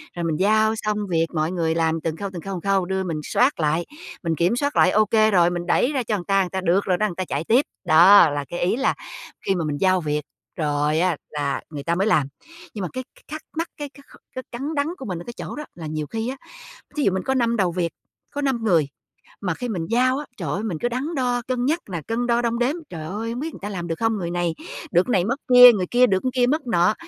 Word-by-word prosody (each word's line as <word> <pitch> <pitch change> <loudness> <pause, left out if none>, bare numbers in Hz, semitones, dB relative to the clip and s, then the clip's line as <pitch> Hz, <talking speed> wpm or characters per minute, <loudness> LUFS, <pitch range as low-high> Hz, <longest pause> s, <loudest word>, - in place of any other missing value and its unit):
Rồi 175 - -3
mình 160 -2 -1
giao 215 +3 +3
xong 215 -1 -2
việc, 165 -1 +1
mọi 155 0 0
người 165 -3 0
làm 165 -1 +1
từng 160 0 -3
khâu, 200 +2 -4
từng 175 - -6
khâu, 195 +4 -5
từng 175 - -5
khâu, 190 -2 +2
đưa 190 +1 -1
mình 165 -4 -3
soát 255 - +2
lại, 160 +2 +1 0.4
mình 165 -2 0
kiểm 175 +8 +2
soát 285 +3 -1
lại 185 - +5
ô 215 +2 +4
kê 215 +1 +3
rồi, 175 -3 +4
mình 175 0 -3
đẩy 245 +9 +2
ra 265 -4 -1
cho 215 -1 -1
người 185 - -4
ta, 195 -1 +3
người 185 - -2
ta: 190 0 -3
"Được 185 +2 +2
rồi 180 -2 +1
đó", 215 - +1
người 180 - -6
ta 185 - -3
chạy 140 0 -2
tiếp, 240 - +3 0.2
đó, 175 +2 +8
là 145 -1 -3
cái 175 - -4
ý 180 +5 +1
là 270 +2 +1 0.5
khi 195 - +2
mà 170 -3 -1
mình 145 -1 -2
giao 185 +2 +2
việc 150 -1 -1 0.3
rồi 150 0 0
á 175 -2 +1
là 145 -2 -2
người 145 -3 -7
ta 170 +3 0
mới 195 +4 +1
làm. 155 -10 +3 0.5
Nhưng 210 - -5
mà 185 - -2
cái 255 - -4
c 255 - -27
thắc 310 0 -5 0.2
mắc, 330 - -1
cái 290 -1 -5
cái 280 - -17
kh - - -14 0.2
cái 255 - -4
cắn 275 +6 -4
đắn 285 0 +1
của 265 - -8
mình 180 -4 -4
ở - - -8
cái 240 - -7
chỗ - - -6
đó 300 - -6
là 165 -2 -7
nhiều 155 -1 -3
khi 225 +6 -3
á, 265 - -4 0.6
thí 300 - 0
dụ 195 - +3
mình 190 -1 -2
có 265 - 0
5 235 -3 +1
đầu 185 -4 +2
việc, 170 -1 -1 0.4
có 290 - -3
5 265 -5 0
người, 170 -9 +3 0.5
mà 180 -4 -1
khi 245 +9 -5
mình 175 -7 -2
giao 255 +3 +2
á, 295 - -5
trời 170 -7 -4
ơi, 195 +8 -2
mình 195 -8 -2
cứ 240 - 0
đắn 270 +7 -3
đo 245 -2 0
cân 250 -1 -1
nhắc 315 +6 +1
nè, 170 -3 -3
cân 240 +2 -1
đo 235 0 +2
đong 235 0 -1
đếm, 250 +5 +1
trời 160 -3 -7
ơi, 220 +6 -4
hông 240 - -4
biết 315 +3 -4
người - - -10
ta 205 - -4
làm 175 -4 -5
được 165 - -2
không, 225 -1 +1
người 170 -3 -3
này 175 -2 -1 0.4
được 175 - +3
cái 180 -2 +3
mất 255 +7 -1
kia, 250 0 +11
người 185 -4 -1
kia 245 +1 +5
được 190 -3 +1
kia 245 -1 +3
mất 290 0 0
nọ. 180 -2 +3
195 Hz, 285 wpm, -23 LUFS, 170-240 Hz, 0.6 s, kia